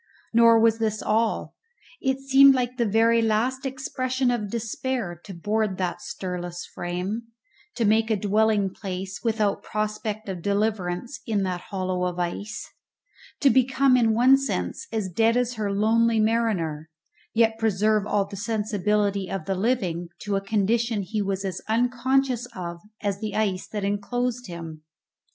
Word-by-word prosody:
Nor 230 Hz, 0 st, +6 dB
was 225 Hz, 0 st, +3 dB
this 215 Hz, -1 st, -1 dB
all. 225 Hz, +1 st, 0 dB, 0.5 s
It 265 Hz, 0 st, +1 dB
seemed 270 Hz, 0 st, +7 dB
like 250 Hz, 0 st, -1 dB
the 235 Hz, -3 st, +1 dB
very 230 Hz, +2 st, +4 dB
last 240 Hz, +5 st, 0 dB
expression 260 Hz, -1 st, -1 dB
of 215 Hz, -4 st, -2 dB
despair 225 Hz, -4 st, -3 dB
to 195 Hz, -, -8 dB
board 205 Hz, +2 st, -1 dB
that 180 Hz, -2 st, -2 dB
stirless 175 Hz, -1 st, -5 dB
frame; 185 Hz, +6 st, -4 dB, 0.5 s
to 230 Hz, -, 0 dB
make 220 Hz, +2 st, +3 dB
a 220 Hz, -, +3 dB
dwelling 205 Hz, 0 st, +2 dB
place, 190 Hz, 0 st, -5 dB
without 220 Hz, -3 st, +1 dB
prospect 215 Hz, 0 st, -3 dB
of 185 Hz, -3 st, -5 dB
deliverance, 200 Hz, -, -1 dB
in 210 Hz, -3 st, +1 dB
that 180 Hz, -2 st, -2 dB
hollow 185 Hz, -2 st, -1 dB
of 180 Hz, -1 st, -3 dB
ice; 180 Hz, +4 st, -4 dB, 0.7 s
to 275 Hz, -, +6 dB
become 260 Hz, +1 st, +4 dB
in 225 Hz, -3 st, +3 dB
one 260 Hz, +4 st, +6 dB
sense 90 Hz, -, -3 dB
as 220 Hz, -4 st, -1 dB
dead 225 Hz, +6 st, +2 dB
as 245 Hz, 0 st, 0 dB
her 210 Hz, -3 st, -2 dB
lonely 225 Hz, +3 st, +3 dB
mariner, 205 Hz, -9 st, 0 dB, 0.5 s
yet 225 Hz, -1 st, +3 dB
preserve 215 Hz, -1 st, +2 dB
all 205 Hz, -2 st, +1 dB
the 200 Hz, +1 st, -9 dB
sensibility 210 Hz, -2 st, 0 dB
of 190 Hz, -5 st, -4 dB
the 195 Hz, -, 0 dB
living 185 Hz, -5 st, -1 dB
to 205 Hz, -1 st, -2 dB
a 195 Hz, -, 0 dB
condition 215 Hz, +2 st, 0 dB
he 210 Hz, +3 st, -2 dB
was 195 Hz, 0 st, -2 dB
as 190 Hz, -, -4 dB
unconscious 245 Hz, +2 st, +1 dB
of 170 Hz, -1 st, -6 dB, 0.2 s
as 200 Hz, -2 st, -1 dB
the 215 Hz, -1 st, -4 dB
ice 195 Hz, -4 st, 0 dB
that 210 Hz, -2 st, -4 dB
enclosed 245 Hz, +5 st, -2 dB
him. 165 Hz, -3 st, -8 dB
215 Hz, 155 wpm, -25 LUFS, 195-230 Hz, 0.7 s, seemed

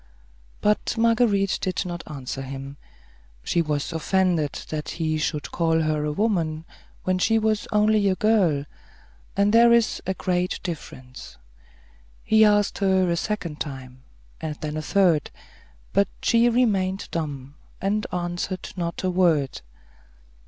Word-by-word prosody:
But 210 Hz, +1 st, +1 dB
Marguerite 225 Hz, -4 st, +2 dB
did 185 Hz, +1 st, -1 dB
not 175 Hz, -1 st, -5 dB
answer 135 Hz, -3 st, -6 dB
him; 135 Hz, +1 st, -7 dB, 0.7 s
she 170 Hz, -, +1 dB
was 150 Hz, 0 st, -2 dB
offended 165 Hz, -2 st, +1 dB, 0.2 s
that 150 Hz, -1 st, -4 dB
he 155 Hz, -2 st, 0 dB
should 150 Hz, -1 st, -2 dB
call 165 Hz, -1 st, +1 dB
her 155 Hz, -1 st, 0 dB
a 150 Hz, -, -1 dB
woman 165 Hz, -4 st, -1 dB, 0.4 s
when 185 Hz, 0 st, 0 dB
she 225 Hz, +4 st, +3 dB
was 220 Hz, -1 st, 0 dB
only 210 Hz, -1 st, +3 dB
a 190 Hz, -, +1 dB
girl; 185 Hz, -9 st, +2 dB, 0.7 s
and 200 Hz, +1 st, +3 dB
there 235 Hz, +1 st, +7 dB
is 235 Hz, -1 st, +3 dB
a 190 Hz, -, 0 dB
great 180 Hz, -1 st, -1 dB
difference. 130 Hz, -, -8 dB, 0.9 s
He 220 Hz, 0 st, +5 dB
asked 205 Hz, -1 st, +3 dB
her 190 Hz, -2 st, +2 dB
a -, -, +2 dB
second 170 Hz, -5 st, -3 dB
time, 130 Hz, -3 st, -7 dB, 0.4 s
and 155 Hz, -2 st, -3 dB
then 150 Hz, 0 st, -5 dB
a 155 Hz, -, -2 dB
third; 170 Hz, -3 st, +2 dB, 0.6 s
but 200 Hz, 0 st, +3 dB, 0.2 s
she 235 Hz, +1 st, +4 dB
remained 200 Hz, -6 st, +1 dB
dumb, 145 Hz, -4 st, -4 dB, 0.3 s
and 210 Hz, +2 st, -1 dB
answered 175 Hz, +1 st, -3 dB
not 170 Hz, -1 st, -4 dB
a 185 Hz, -, +1 dB
word. 165 Hz, -, +1 dB
180 Hz, 140 wpm, -24 LUFS, 155-205 Hz, 0.9 s, there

